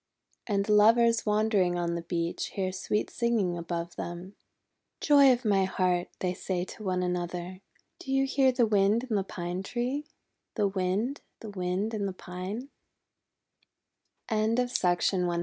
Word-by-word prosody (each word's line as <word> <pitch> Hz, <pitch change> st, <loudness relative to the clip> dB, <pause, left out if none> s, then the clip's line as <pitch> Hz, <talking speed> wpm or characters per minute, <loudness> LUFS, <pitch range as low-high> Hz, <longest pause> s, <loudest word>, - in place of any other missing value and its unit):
And 200 Hz, -2 st, 0 dB
Lovers 225 Hz, +2 st, +4 dB
wandering 210 Hz, -4 st, +2 dB
on 170 Hz, -1 st, -1 dB
the 170 Hz, -, -3 dB
beach 170 Hz, 0 st, -2 dB
hear 190 Hz, -2 st, -1 dB
sweet 190 Hz, +3 st, -2 dB
singing 225 Hz, -7 st, 0 dB
above 170 Hz, 0 st, -5 dB
them. 175 Hz, +3 st, -6 dB, 0.7 s
"Joy 285 Hz, -3 st, +6 dB
of 245 Hz, 0 st, 0 dB
my 195 Hz, -2 st, +3 dB
heart," 180 Hz, -2 st, 0 dB
they 180 Hz, -1 st, 0 dB
say 180 Hz, -1 st, -3 dB
one 185 Hz, -3 st, -1 dB
to -, -, 0 dB
another, 180 Hz, +1 st, -4 dB, 0.4 s
"do 270 Hz, -, -7 dB
you 270 Hz, 0 st, +3 dB
hear 270 Hz, -1 st, +3 dB
the 245 Hz, -2 st, +3 dB
Wind 210 Hz, +3 st, +2 dB
in -, -, +2 dB
the 195 Hz, -, +1 dB
Pine 175 Hz, -1 st, -4 dB
Tree 250 Hz, +8 st, -3 dB, 0.2 s
— -, -, -54 dB
the 210 Hz, -3 st, +2 dB
Wind, 195 Hz, +8 st, -1 dB, 0.2 s
the 220 Hz, -, -7 dB
Wind 185 Hz, +3 st, -2 dB
in 205 Hz, -2 st, -1 dB
the 190 Hz, -, -4 dB
Pine?" 185 Hz, +8 st, -6 dB
195 Hz, 145 wpm, -28 LUFS, 180-230 Hz, 0.7 s, Joy